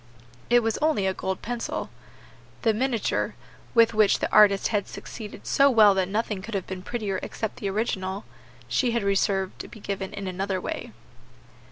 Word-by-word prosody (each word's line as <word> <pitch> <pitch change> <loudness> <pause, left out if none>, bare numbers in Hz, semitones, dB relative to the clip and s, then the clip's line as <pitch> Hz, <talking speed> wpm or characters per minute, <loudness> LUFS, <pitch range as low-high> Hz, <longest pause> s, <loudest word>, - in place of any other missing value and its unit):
It 240 0 +5
was 225 -1 0
only 305 -10 +2
a 190 - +1
gold 190 0 -4
pencil. 240 +1 -3 0.7
The 225 -2 +4
miniature 235 -1 0 0.4
with 230 -1 +6
which 215 -2 +4
the - - -2
artist 200 -2 +6
had 205 -3 0
succeeded 215 -3 -9
so 280 0 +4
well 215 -5 +7
that 190 -1 +1
nothing 210 -1 -1
could 215 +2 -6
have 190 - -2
been 185 -1 -6
prettier 205 -2 -3
except 220 - -4
the 200 - -3
original 195 -2 -2
herself 120 0 -24
she 240 - +1
had 235 -3 0
reserved 195 -1 0
to - - -6
be 225 - -12
given 195 -1 -4
in 200 -1 -6
another 190 +1 -2
way. - - -5
200 Hz, 180 wpm, -26 LUFS, 190-225 Hz, 0.7 s, well